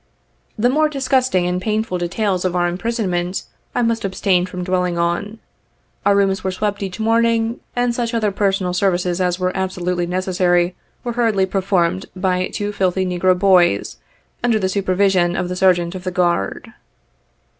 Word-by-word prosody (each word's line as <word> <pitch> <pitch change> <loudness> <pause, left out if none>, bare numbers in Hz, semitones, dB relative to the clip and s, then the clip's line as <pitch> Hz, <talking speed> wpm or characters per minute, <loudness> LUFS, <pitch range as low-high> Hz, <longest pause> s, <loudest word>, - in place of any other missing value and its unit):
The 225 +3 +3
more 305 +2 +2
dis 275 -3 -4
gusting 255 -10 +2
and 180 +1 -1
painful 215 -2 -1
details 185 +2 -1
of 185 -1 -1
our 175 0 +2
imprisonment, 185 -2 -2 0.3
I 245 - +2
must 230 -1 0
ab 190 -1 -3
stain 180 -2 +2
from 180 0 -5
dwelling 180 -1 0
on. 175 +6 -1 0.7
Our 200 - +5
rooms 195 -1 +1
were 190 - 0
swept 205 +2 -2
each 195 +1 -5
morn 225 +1 +3
ing, 230 0 0 0.2
and 245 -1 +1
such 235 0 -2
other 215 -3 +1
personal 195 -2 0
services 180 -1 0
as 180 -1 +1
were 185 0 -1
absolutely 180 -2 -2
ne 180 +1 -2
cessary, 180 -1 +1 0.3
were 240 - -3
hurriedly 225 -5 +2
performed 185 -1 0
by 185 0 0
two 205 0 -3
filthy 190 -2 0
negro 180 0 +2
boys, 180 -2 +3 0.5
under 235 -2 +3
the 190 -3 0
supervision 185 -2 +2
of 180 0 -2
the 180 - -3
Sergeant 180 -2 +2
of 185 -1 -7
the 185 - -2
Guard. 175 - -1
185 Hz, 175 wpm, -19 LUFS, 180-210 Hz, 0.7 s, Our